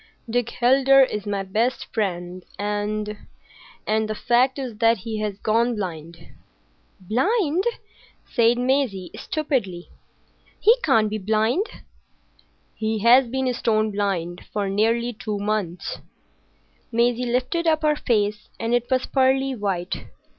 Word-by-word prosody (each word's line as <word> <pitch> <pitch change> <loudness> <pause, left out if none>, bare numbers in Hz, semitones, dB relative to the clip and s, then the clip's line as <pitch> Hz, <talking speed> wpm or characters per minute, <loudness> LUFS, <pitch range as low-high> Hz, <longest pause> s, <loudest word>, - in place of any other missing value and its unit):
Dick 240 0 0
Heldar 270 +2 +6
is 210 -5 -3
my 200 -1 -1
best 220 +7 -1
friend, 180 -4 -3
and—and—the 210 +1 -4
fact 250 +4 +2
is 250 -6 -6
that 230 0 +4
he 215 +3 -5
has 210 -2 -3
gone 230 +3 +1
blind." 170 -5 -5 0.8
"Blind!" 315 - +1 0.6
said 235 -1 +2
Maisie, 250 -7 0
stupidly. 235 - -2 0.7
"He 445 - +6
can't 225 -7 +3
be 215 +1 -3
blind." 220 - +1 1.1
"He 220 0 -2
has 245 +2 +6
been 260 +1 -1
stone 215 -2 +1
blind 185 -4 -2
for 205 -2 -1
nearly 230 +4 +1
two 215 -2 -4
months." 200 -4 -3 0.9
Maisie 240 +1 +1
lifted 255 +8 0
up 315 -1 +2
her 300 -1 +3
face, 210 -5 -1
and 230 +1 -1
it 245 0 +1
was 260 -1 +1
pearly 265 0 +2
white. 195 -6 -3
225 Hz, 120 wpm, -23 LUFS, 205-255 Hz, 1.1 s, Heldar